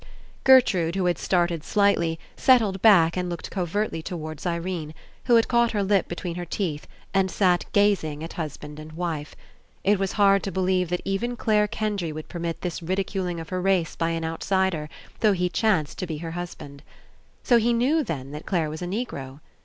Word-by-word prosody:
Gertrude 195 -11 +5
who 190 -2 0
had 175 -1 +1
started 175 -3 0
slightly, 170 -6 +2 0.2
set 260 -2 +6
tled 195 -4 -2
back 175 -7 +6
and 180 -1 -2
looked 170 -1 -6
covertly 185 -1 -2
towards 155 -2 -6
Irene, 170 -2 -3 0.3
who 240 - +5
had 230 - +4
caught 235 -1 +2
her 205 -2 +1
lip 195 -1 +2
between 175 0 -4
her 175 - -3
teeth 165 -4 -3 0.3
and 195 -1 +2
sat 180 -1 +2
gazing 180 -7 +2
at 165 - -6
husband 150 -2 -6
and 155 0 -10
wife. 160 -3 -4 0.5
It 200 0 +3
was 195 -1 -1
hard 200 -1 +4
to 195 - -4
believe 185 -2 +1
that 180 0 -2
even 235 +5 -1
Clare 210 -2 +2
Kendry 205 -6 -2
would 155 0 -8
permit 170 -2 -4
this 175 -2 -4
ridiculing 185 0 -2
of 165 - -8
her 185 -1 -2
race 185 -3 +1
by 165 - 0
an 165 -1 -2
outsider, 165 -1 -1 0.3
though 215 -2 +4
he 180 -1 0
chanced 175 -3 0
to 185 - -3
be 160 -2 -4
her 165 +1 -6
husband. 165 -5 -7 0.6
So 240 -2 +5
he 235 +2 +2
knew, 265 +7 +2
then, 140 - -5
that 150 +1 -8
Clare 165 -5 0
was 155 - -7
a 175 - -3
Negro? 145 - -5
180 Hz, 190 wpm, -25 LUFS, 165-200 Hz, 0.6 s, set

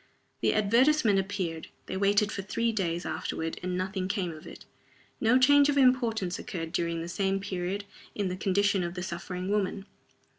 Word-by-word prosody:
The - - +2
advertisement 230 +1 +4
appeared. 185 -5 -3 0.2
They - - -5
waited 205 +2 +2
for 200 - -3
three 230 +4 -1
days 175 -5 -2
afterward, 160 +1 -3
and 180 0 -2
nothing 185 0 -2
came 190 -3 -1
of 155 -1 -11
it. - - -11 0.5
No 230 +2 +4
change 285 +2 +6
of 285 - +1
importance 235 -8 +2
occurred, 165 -3 -5
during 170 -2 -1
the - - -6
same 195 +2 0
period, 195 0 -3 0.3
in 200 -2 -1
the 180 - -2
condition 195 0 +1
of 175 0 -3
the 180 - -4
suffering 180 +1 -5
woman. 200 -1 -1
195 Hz, 175 wpm, -28 LUFS, 180-210 Hz, 0.5 s, change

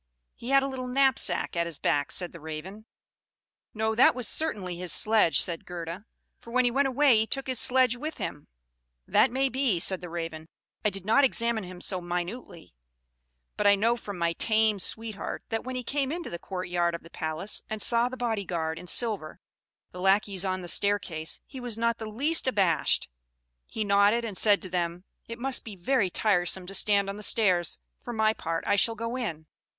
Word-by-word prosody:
"He 235 - -9
had 275 0 +4
a - - -1
little 260 -2 -5
knapsack 255 -10 +2
at 170 0 0
his 165 -3 -6
back," 145 -1 0
said 180 -2 0
the 170 - -11
Raven. 160 +8 -8 0.8
"No, 220 0 -1
that 240 +3 +5
was 250 -4 -3
certainly 200 - -1
his 180 -1 -1
sledge," 215 -4 +4
said 170 -2 -2
Gerda; 175 +3 -7 0.3
"for - - -14
when 255 +1 +2
he 245 - +2
went 275 +3 +2
away 270 -2 +4
he 220 +1 +1
took 270 +2 -2
his 255 -3 0
sledge 255 -1 +4
with 300 +5 -6
him." 145 - -6 0.6
"That - - +4
may 265 +2 0
be," 260 -8 0
said 185 +2 +3
the 175 - -8
Raven; 165 -1 -6 0.3
"I 210 - +3
did 195 -1 -6
not 225 +7 +4
examine 235 -5 +1
him 180 0 -10
so 185 -2 +2
minutely; 175 - -6 0.8
but 205 - +1
I 200 - +6
know 225 +4 +2
from 205 -5 -7
my 170 -1 0
tame 215 +2 +2
sweetheart, 220 +2 -3
that 225 0 -3
when 255 0 -5
he 250 - -3
came 275 +1 -1
into 340 +1 -5
the 170 - -5
court 185 0 -6
yard 175 -1 0
of 170 - -9
the 165 - -15
palace, 160 +6 -2
and 220 - -4
saw 235 +3 +3
the 255 - -8
body 225 -4 -2
guard 160 -3 -3
in 180 - -11
silver, 205 -6 +1 0.5
the 180 - -9
lackeys 195 0 +2
on 185 -1 -2
the - - -7
staircase, 180 -5 0
he 265 - -10
was 245 -3 -2
not 235 0 0
the 220 -1 -6
least 285 +8 +2
abashed; 195 -10 +1 0.6
he 220 - -3
nodded, 205 +3 +3
and 210 -4 -5
said 205 +1 +3
to 185 - -6
them, 175 0 -2 0.2
'It 230 - -7
must 265 +2 0
be 215 -3 -9
very 195 +2 +1
tiresome 180 -2 +1
to 195 - -8
stand 200 0 +3
on 200 +1 -5
the - - -8
stairs; 185 -6 +3 0.2
for 240 - -8
my 220 -1 +2
part, 165 -5 -4
I - - +2
shall 225 +3 +2
go 230 +2 -4
in.' 170 -11 -4
205 Hz, 205 wpm, -27 LUFS, 175-240 Hz, 0.8 s, I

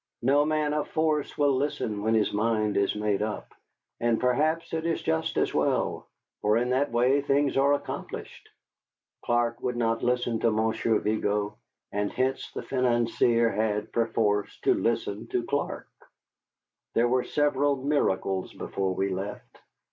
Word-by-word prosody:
No 140 +4 +4
man 155 -1 +1
of 150 0 -1
force 155 -2 0
will 145 -2 +3
listen 130 -6 -2
when 110 +2 +2
his 110 -2 +1
mind 110 -1 +1
is 100 0 +1
made 105 -1 0
up, 105 0 -4 0.5
and 115 -1 +1
perhaps 155 +7 +1
it 160 0 -1
is 165 0 0
just 80 - -1
as - - +1
well. - - 0 0.3
For 105 +1 +3
in 125 +1 0
that 130 0 +1
way 125 +4 +3
things 140 0 +1
are 140 +1 +4
accomplished. 145 - -6 0.7
Clark 120 0 0
would 125 -1 -2
not 115 -1 0
listen 120 -2 0
to 115 - +3
Monsieur 110 +1 +1
Vigo, 105 0 -1 0.3
and 105 0 -1
hence 130 +1 -1
the - - -5
financier 120 -2 +2
had, 105 0 -1
perforce, 110 -3 0
to - - +4
listen 110 -2 -1
to 120 - -1
Clark. 140 +3 -2 1.1
There 120 +1 +4
were 125 +1 +2
several 145 -1 +1
miracles 115 -9 0
before 95 -1 -3
we 100 +1 0
left. 95 +2 -6
120 Hz, 150 wpm, -27 LUFS, 105-140 Hz, 1.1 s, No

